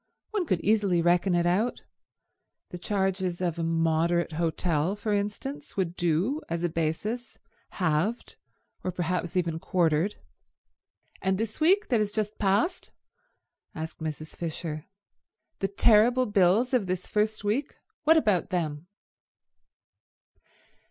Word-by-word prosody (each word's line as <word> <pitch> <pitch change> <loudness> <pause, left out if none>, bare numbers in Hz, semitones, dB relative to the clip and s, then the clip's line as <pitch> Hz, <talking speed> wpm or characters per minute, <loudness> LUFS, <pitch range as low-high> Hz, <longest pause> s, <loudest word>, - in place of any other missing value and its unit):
One 405 -6 -1
could 175 -2 +1
easily 205 -4 +2
reckon 175 +2 +3
it 175 0 +2
out. 200 +8 +1 0.9
The 180 - -6
charges 190 -2 -1
of 175 -2 -1
a - - -1
moderate 165 +1 +1
hotel, 165 +1 0
for 210 0 -2
instance, 210 +8 -4
would 180 -3 -1
do 175 - 0
as 170 +1 -2
a 175 - +1
basis, 175 +9 -3 0.4
halved, 180 +6 -1 0.5
or 185 - -1
perhaps 175 0 -2
even 165 -2 0
quartered." 170 +2 +1 1.1
"And 190 0 +1
this 220 +1 -4
week 380 +7 +3
that 240 -4 +3
has 210 -1 0
just 215 0 -3
passed?" 210 - +1 0.9
asked 160 +1 -6
Mrs. 155 -1 -6
Fisher. 160 -2 -4 0.7
"The 195 - +1
terrible 230 +5 +4
bills 205 +4 +3
of 230 -7 +2
this 185 0 -2
first 215 0 0
week? 230 +8 -1 0.3
What 320 +1 +6
about 210 - +2
them?" 165 -4 -2
185 Hz, 125 wpm, -27 LUFS, 170-215 Hz, 1.1 s, What